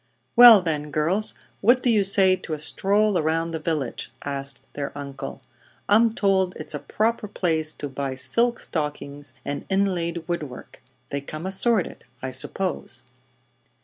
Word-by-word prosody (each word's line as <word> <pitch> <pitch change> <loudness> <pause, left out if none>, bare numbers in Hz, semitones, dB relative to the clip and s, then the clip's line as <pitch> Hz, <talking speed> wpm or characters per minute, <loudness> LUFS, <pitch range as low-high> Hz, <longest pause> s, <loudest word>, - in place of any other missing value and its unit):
"Well 235 -5 +10
then, 150 -3 -2
girls, 165 +9 +1 0.2
what 245 +5 +4
do 245 - +3
you 210 -3 +3
say 195 -1 +4
to 170 - -7
a 155 - -3
stroll 200 +5 +1
around 165 +1 0
the 160 - -3
village?" 155 -7 -3
asked 140 -1 -4
their 140 -1 -4
uncle. 140 -1 -7 0.4
"I'm 225 +2 +5
told 190 -3 +1
it's - - -6
a - - -3
proper 220 0 -1
place 160 -6 +1
to 145 - -6
buy 135 -1 -4
silk 235 - 0
stockings 145 -2 -5
and 145 0 -4
inlaid 175 -4 -1
wood 175 -1 -1
work. 135 -5 -10 0.3
They 140 - -2
come 155 +4 -7
assorted, 195 +1 0 0.2
I 130 +1 -5
suppose." 130 -2 -1
170 Hz, 150 wpm, -24 LUFS, 145-200 Hz, 0.4 s, Well